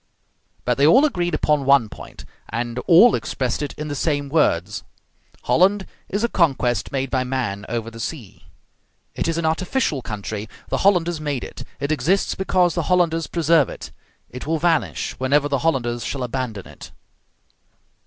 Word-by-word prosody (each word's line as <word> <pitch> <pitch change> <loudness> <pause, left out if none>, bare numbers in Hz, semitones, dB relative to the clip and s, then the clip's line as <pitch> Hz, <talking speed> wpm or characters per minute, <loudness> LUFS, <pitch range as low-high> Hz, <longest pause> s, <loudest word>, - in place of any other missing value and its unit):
But 125 +1 0
they 145 - +6
all 260 - +6
agreed 175 - 0
upon 150 -2 +1
one 135 -4 +4
point, - - -11 0.2
and 120 +2 -3
all 185 +8 +7
expressed 130 -1 -2
it 145 - -3
in 150 - -6
the 145 - -3
same 145 -1 -1
words: 105 - +1 0.6
Holland 195 +2 +3 0.2
is 205 +3 -1
a - - +3
conquest 130 - +1
made 135 -1 -2
by 130 -1 +1
man 125 -6 -3
over 115 0 -3
the 115 - -11
sea; 120 - -7 0.7
it - - -2
is 165 0 -1
an 170 - -1
artificial 160 - 0
country: 110 -1 -5 0.2
the - - -1
Hollanders 175 -4 +2
made 145 -4 -2
it; - - -8 0.2
it 140 - -2
exists 155 +7 +1
because 185 -2 +1
the 170 -4 -2
Hollanders 170 -3 +2
preserve 165 -3 +3
it; - - -9 0.4
it 125 +3 -8
will 160 +1 +1
vanish 165 0 0
whenever 140 +3 +2
the 140 -2 0
Hollanders 120 -6 0
shall 135 -2 -3
abandon 120 -5 -4
it. - - -12
145 Hz, 165 wpm, -22 LUFS, 125-170 Hz, 0.7 s, all